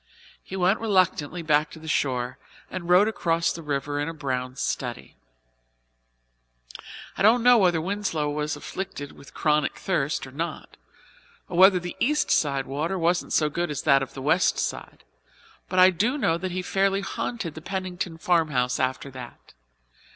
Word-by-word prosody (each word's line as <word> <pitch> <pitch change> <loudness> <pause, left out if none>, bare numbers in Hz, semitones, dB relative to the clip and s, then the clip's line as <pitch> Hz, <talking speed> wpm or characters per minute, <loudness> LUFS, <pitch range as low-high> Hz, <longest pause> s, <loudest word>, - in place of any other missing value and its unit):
He 190 - -8
went 190 +3 +2
reluctantly 185 -6 +1
back 150 -1 +2
to - - -12
the 160 0 -11
shore 130 -3 -1 0.3
and 175 -2 -6
rowed 180 +4 +6
across 170 -6 0
the 165 - -7
river 145 -1 -2
in 145 +2 -1
a 165 - -7
brown 130 -3 -3
study. 65 - -4 2.0
I - - -5
don't 225 +4 +5
know 245 -1 +7
whether 175 -4 +3
Winslow 180 -4 -2
was 150 0 -2
afflicted 150 -1 -6
with 140 - -16
chronic 150 -1 +1
thirst 155 -8 -1
or 130 - -11
not, 165 +5 -5 0.7
or 180 - -6
whether 190 +1 +7
the 175 0 -7
East 300 +4 +1
side 140 -3 +1
water 155 +8 -2
wasn't 175 +1 0
so 155 - +3
good 170 +4 -2
as 150 - -4
that 140 -4 +5
of 135 - -6
the 135 - -6
West 165 +6 +2
side; - - -4 0.7
but 185 - -3
I 185 +1 +8
do 220 - 0
know 165 - +1
that 185 +2 -3
he 185 +1 -3
fairly 195 +1 +1
haunted 195 -3 -4
the 160 - -9
Pennington 185 -1 -4
farmhouse 155 -8 +1
after 130 +2 -2
that. 125 - -11
165 Hz, 165 wpm, -25 LUFS, 145-185 Hz, 2.0 s, I